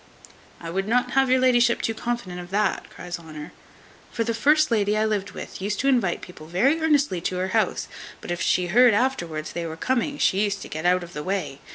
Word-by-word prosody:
"I 165 -1 -7
would 195 +3 -2
not 245 +3 +1
have 270 -1 +3
your 260 0 +4
la'ship 240 -2 +4
too 225 - -1
confident 225 -6 -4
of 175 0 -9
that," 205 +1 0
cries 175 0 -7
Honour; 155 0 -9 0.6
"for 230 - -1
the 230 - -1
first 295 +6 +3
lady 210 -2 +2
I 215 - +2
lived 205 -2 -2
with - - -8
used 205 +2 -2
to 275 - 0
invite 240 -10 +2
people 155 -3 -11
very 265 - +2
earnestly 290 - +2
to 180 +1 -2
her 185 +1 -1
house; 215 -1 0 0.3
but - - -7
if 175 - -3
she 180 - +2
heard 235 +5 +5
afterwards 170 -11 -1
they 170 -1 -3
were 160 0 -7
coming, 260 - -1
she 195 -5 +2
used 200 -1 -2
to - - -10
get 160 +3 -2
out 180 0 +3
of 175 0 -11
the 150 - -5
way. 185 -5 -3
200 Hz, 225 wpm, -24 LUFS, 175-240 Hz, 0.6 s, heard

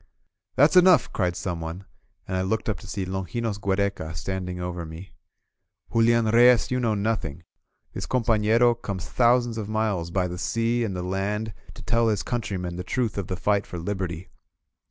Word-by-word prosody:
• - - -32
• - - -34 0.3
." - - -56
"That's 145 +5 +5
enough!'' 180 -6 +6
cried 90 -2 0
someone, 85 +1 -5 0.4
and 95 - -3
I 95 - +1
looked 100 +4 -1
up 105 -4 -1
to 105 - -12
see 95 -1 -3
Longinos 100 +4 -3
Giiereca 95 -5 -1
standing 90 +1 -4
over 90 -1 -4
me. 85 +3 -10 0.8
"Julian 115 0 +4
Reyes, 120 +2 +5
you 125 - +1
know 115 -3 +1
nothing. 100 -8 -2 0.5
This - - -5
companero 115 0 +3
comes 100 -5 -6
thou 125 0 +5
sands 120 -2 -4
of 105 -1 -5
miles 110 -6 -1
by 90 +1 0
the 90 0 -6
sea 115 +3 0
and 100 -4 -2
the 90 - -3
land 100 +4 -2 0.2
to - - -11
tell 115 -1 +2
his 105 -2 0
coun 120 -1 -2
trymen 90 -4 -4
the 90 - -4
truth 115 +3 -1
of 95 - -4
the 90 - -3
fight 100 +1 +1
for 90 - -6
Liberty. 90 -1 -4
100 Hz, 195 wpm, -25 LUFS, 90-115 Hz, 0.8 s, enough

